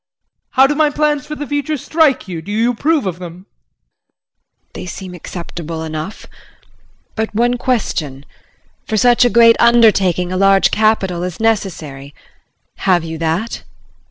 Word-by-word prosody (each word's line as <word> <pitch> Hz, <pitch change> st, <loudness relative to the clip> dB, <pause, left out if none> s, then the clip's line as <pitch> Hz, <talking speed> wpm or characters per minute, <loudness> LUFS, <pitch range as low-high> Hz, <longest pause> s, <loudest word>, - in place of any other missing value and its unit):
How 265 Hz, 0 st, +6 dB
do 280 Hz, -, +1 dB
my 300 Hz, 0 st, +2 dB
plans 295 Hz, -1 st, -1 dB
for 300 Hz, -, -5 dB
the 295 Hz, -, -5 dB
future 290 Hz, +1 st, -2 dB
strike 305 Hz, -3 st, +1 dB
you? 170 Hz, -3 st, -5 dB
Do 200 Hz, -, -8 dB
you 225 Hz, +3 st, +1 dB
approve 295 Hz, +2 st, 0 dB
of 180 Hz, -2 st, -4 dB
them? 180 Hz, +1 st, -10 dB
JULIE. -, -, -54 dB
They -, -, -7 dB
seem 185 Hz, 0 st, -8 dB
acceptable 170 Hz, -2 st, -7 dB
enough. 160 Hz, +5 st, -6 dB, 0.9 s
But 220 Hz, -1 st, -3 dB
one 240 Hz, +2 st, +2 dB
question. 155 Hz, -, -2 dB, 0.6 s
For 220 Hz, -, -1 dB
such 245 Hz, +2 st, +4 dB
a -, -, +4 dB
great 230 Hz, +1 st, +6 dB
undertaking 200 Hz, -7 st, +3 dB
a 185 Hz, -, -2 dB
large 195 Hz, 0 st, +4 dB
capital 205 Hz, -5 st, +1 dB
is 180 Hz, -2 st, -5 dB
necessary, 155 Hz, -11 st, -2 dB, 0.6 s
have 180 Hz, -3 st, +1 dB
you 160 Hz, -1 st, -6 dB
that? 165 Hz, +8 st, -2 dB
195 Hz, 150 wpm, -16 LUFS, 170-245 Hz, 0.9 s, How